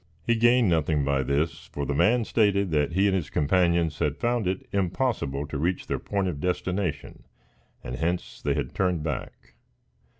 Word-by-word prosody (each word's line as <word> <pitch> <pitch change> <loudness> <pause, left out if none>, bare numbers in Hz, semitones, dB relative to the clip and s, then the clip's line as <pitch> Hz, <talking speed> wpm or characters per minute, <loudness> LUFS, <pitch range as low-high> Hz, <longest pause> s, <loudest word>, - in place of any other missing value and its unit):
He 120 - +3
gained 120 0 +4
nothing 80 -4 +1
by 70 -1 +1
this, 70 +5 -1
for 70 - -4
the 70 - -1
man 115 - +3
stated 100 -5 +2
that 75 +1 +1
he 95 +3 +3
and 100 -2 +3
his 80 -5 -2
companions 85 0 +1
had 75 0 0
found 120 -4 0
it 95 +1 -3
impossible 95 - -1
to 70 -1 -5
reach 90 +4 -1
their - - -2
point 100 -2 -1
of 80 -6 -3
destination, 90 -3 -2 0.6
and 60 - -5
hence 85 +4 -2
they - - 0
had - - -3
turned 90 -4 0
back. 75 -4 -6
85 Hz, 175 wpm, -26 LUFS, 75-100 Hz, 0.6 s, gained